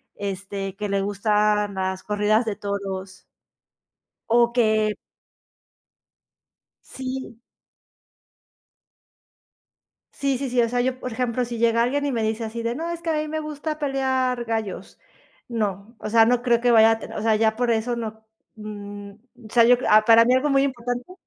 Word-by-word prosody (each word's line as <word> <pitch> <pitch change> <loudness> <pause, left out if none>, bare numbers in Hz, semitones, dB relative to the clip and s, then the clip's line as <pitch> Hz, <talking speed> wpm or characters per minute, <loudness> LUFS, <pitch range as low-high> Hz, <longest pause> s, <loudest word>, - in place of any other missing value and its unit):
este, 195 0 -5
que 210 +1 -4
le 195 0 0
gustan 210 0 +1
las 190 0 -2
corridas 210 +3 +1
de 215 -3 -2
toros. 195 -2 -5 1.0
O 235 +1 +4
que 215 -3 +2 1.9
Sí. 260 -2 -7 2.8
Sí, 275 -2 -1
sí, 270 -1 -3
sí. 245 0 +2
O 230 - +1
sea, 245 +1 -1
yo 255 +1 -1
por 250 - -5
ejemplo, 250 0 -1
si 235 -1 -6
llega 230 0 +3
alguien 280 +4 0
y 280 - -1
me 230 - -1
dice 220 +1 -1
así 230 +1 -5
de: 230 +1 -2
"No 330 +4 -4
es 340 -1 -5
que 335 - -2
a - - +1
mí 305 0 -2
me 315 +1 -3
gusta 305 0 -5
pelear 260 -3 0
gallos". 220 -4 -4 0.5
No, 215 -1 -3
o - - -6
sea, 225 0 +6
no 245 +1 +2
creo 235 -2 +2
que 245 0 +2
vaya 225 -1 +6
a 225 - -1
te 215 0 -1
ya 220 0 +2
por 245 0 0
eso 230 +2 0
no, 220 -1 -6 0.3
mm, 205 -1 -8 0.4
sea, 235 0 +5
yo 245 +1 +6
a 215 0 +6
para 230 +1 +7
mí 250 - +3
algo 275 +3 +2
muy 275 0 +4
importante. 245 +2 -3
230 Hz, 165 wpm, -23 LUFS, 210-250 Hz, 2.8 s, para